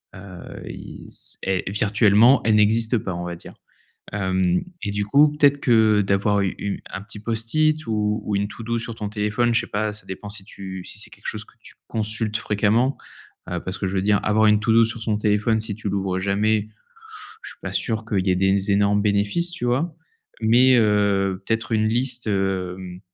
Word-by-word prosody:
heu, 95 Hz, -1 st, -10 dB, 0.3 s
il -, -, -9 dB
c -, -, -3 dB
et 95 Hz, 0 st, -1 dB
virtuellement 105 Hz, +4 st, +4 dB
elles 110 Hz, -1 st, +4 dB
n'existent 110 Hz, +2 st, +3 dB
pas 95 Hz, -3 st, -4 dB
on 85 Hz, 0 st, -4 dB
va 90 Hz, 0 st, -5 dB
dire, 85 Hz, -, -12 dB, 0.6 s
hem 95 Hz, -3 st, 0 dB, 0.2 s
et 105 Hz, -, -2 dB
du 100 Hz, 0 st, -1 dB
coup, 145 Hz, +8 st, +5 dB
peut-être 145 Hz, -1 st, +4 dB
que, 110 Hz, -4 st, +4 dB
heu, -, -, +3 dB
d'avoir 100 Hz, +1 st, +2 dB
u 95 Hz, -, -1 dB
u 100 Hz, -1 st, -4 dB
un 100 Hz, -, -6 dB
petit 105 Hz, 0 st, -9 dB
post-it 135 Hz, +8 st, +1 dB
ou, 105 Hz, -1 st, -1 dB
ou 105 Hz, -, -1 dB
une 100 Hz, +1 st, -1 dB
to 115 Hz, -, -10 dB
do, 115 Hz, +1 st, -1 dB
sur 115 Hz, 0 st, -5 dB
ton 105 Hz, -2 st, -4 dB
téléphone 105 Hz, +3 st, 0 dB
je 115 Hz, -, +4 dB
sais -, -, -8 dB
pas, 105 Hz, +1 st, -1 dB
ça 105 Hz, -, -8 dB
dépend 105 Hz, +2 st, -7 dB
si 105 Hz, -1 st, -6 dB
tu 95 Hz, -2 st, -8 dB
si -, -, -6 dB
c'est 110 Hz, +1 st, -5 dB
quelque 100 Hz, -1 st, -13 dB
chose 105 Hz, -1 st, -3 dB
que -, -, -23 dB
tu -, -, -14 dB
consultes 110 Hz, 0 st, -2 dB
fréquemment, 110 Hz, +6 st, +1 dB, 0.5 s
heu, -, -, -2 dB
parce 95 Hz, -, -4 dB
que 95 Hz, -, -2 dB
je 95 Hz, -, -3 dB
veux 95 Hz, -, +1 dB
dire, 105 Hz, 0 st, +3 dB
avoir 110 Hz, +1 st, +3 dB
une 105 Hz, -1 st, +4 dB
to 110 Hz, +1 st, +1 dB
do, 115 Hz, 0 st, +6 dB
sur 115 Hz, 0 st, -5 dB
son 110 Hz, -2 st, 0 dB
téléphone 105 Hz, +1 st, +1 dB
si 110 Hz, -1 st, -4 dB
tu 110 Hz, -1 st, -4 dB
l'ouvres 95 Hz, -1 st, -1 dB
jamais, 105 Hz, +2 st, +1 dB, 0.7 s
je -, -, -8 dB
suis -, -, -15 dB
pas -, -, -5 dB
sûr 110 Hz, -2 st, -1 dB
qu'il 100 Hz, -3 st, -1 dB
y -, -, +3 dB
ait 90 Hz, -, +2 dB
des 95 Hz, +2 st, +1 dB
énormes 100 Hz, 0 st, +3 dB
bénéfices, 105 Hz, +12 st, 0 dB
tu 125 Hz, -8 st, -4 dB
vois? 140 Hz, +8 st, 0 dB, 0.5 s
Mais, 125 Hz, +4 st, +5 dB
heu, 100 Hz, -3 st, +2 dB
peut-être 115 Hz, 0 st, -1 dB
une 110 Hz, -1 st, +2 dB
liste, 120 Hz, 0 st, -1 dB
hem, 95 Hz, -2 st, -2 dB
105 Hz, 215 wpm, -22 LUFS, 100-115 Hz, 0.7 s, do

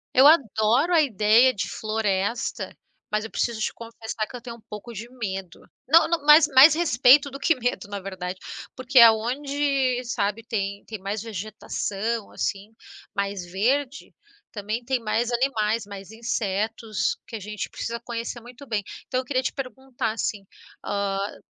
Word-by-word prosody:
Eu 265 Hz, +2 st, +8 dB
adoro 265 Hz, -, +3 dB
a 330 Hz, -, +6 dB
ideia 230 Hz, -1 st, +4 dB
de 200 Hz, -, -3 dB
floresta, 215 Hz, 0 st, -2 dB, 0.4 s
mas 210 Hz, 0 st, 0 dB
eu 225 Hz, -, -9 dB
preciso 235 Hz, -2 st, -1 dB
te -, -, -1 dB
confessar 225 Hz, -1 st, -6 dB
que -, -, -11 dB
eu 245 Hz, -, -7 dB
tenho 235 Hz, -1 st, -8 dB
um -, -, -20 dB
pouco 210 Hz, +3 st, -8 dB
de 230 Hz, +3 st, -7 dB
medo. 195 Hz, -8 st, -6 dB, 0.3 s
Não 325 Hz, +4 st, +6 dB
não, 335 Hz, -3 st, -1 dB
mais 300 Hz, +1 st, +8 dB
mais 280 Hz, +3 st, +8 dB
respeito 280 Hz, -3 st, +5 dB
do 275 Hz, -, -8 dB
que 325 Hz, +3 st, +3 dB
medo, 245 Hz, -4 st, -2 dB
na 200 Hz, 0 st, -5 dB
verdade. 185 Hz, -1 st, -6 dB, 0.4 s
Porque 255 Hz, +1 st, +3 dB
aonde, 255 Hz, +3 st, +3 dB
sabe, 215 Hz, -1 st, -2 dB
tem 200 Hz, -3 st, -3 dB
tem 220 Hz, -2 st, -7 dB
mais 200 Hz, +2 st, -4 dB
vegetação, 215 Hz, +1 st, -4 dB
assim, 200 Hz, +2 st, -3 dB, 0.4 s
mais 200 Hz, -2 st, -2 dB
verde, 250 Hz, +10 st, -1 dB, 0.4 s
também 215 Hz, +3 st, -4 dB
tem 260 Hz, 0 st, 0 dB
mais 230 Hz, +2 st, -1 dB
animais, 230 Hz, -3 st, 0 dB
mais 195 Hz, 0 st, -9 dB
insetos, 220 Hz, -1 st, -2 dB
que 255 Hz, -, -8 dB
a -, -, -4 dB
gente 210 Hz, +1 st, -5 dB
precisa 235 Hz, 0 st, -5 dB
conhecer 235 Hz, 0 st, -5 dB
muito 245 Hz, +4 st, -13 dB
bem. 215 Hz, -4 st, -1 dB, 0.2 s
Então 255 Hz, -, 0 dB
eu 260 Hz, -, -5 dB
queria 255 Hz, 0 st, 0 dB
te 260 Hz, -, -2 dB
perguntar 265 Hz, -3 st, -4 dB
assim, 210 Hz, -2 st, -3 dB, 0.4 s
ah, 200 Hz, 0 st, -2 dB
230 Hz, 160 wpm, -25 LUFS, 210-255 Hz, 0.4 s, Eu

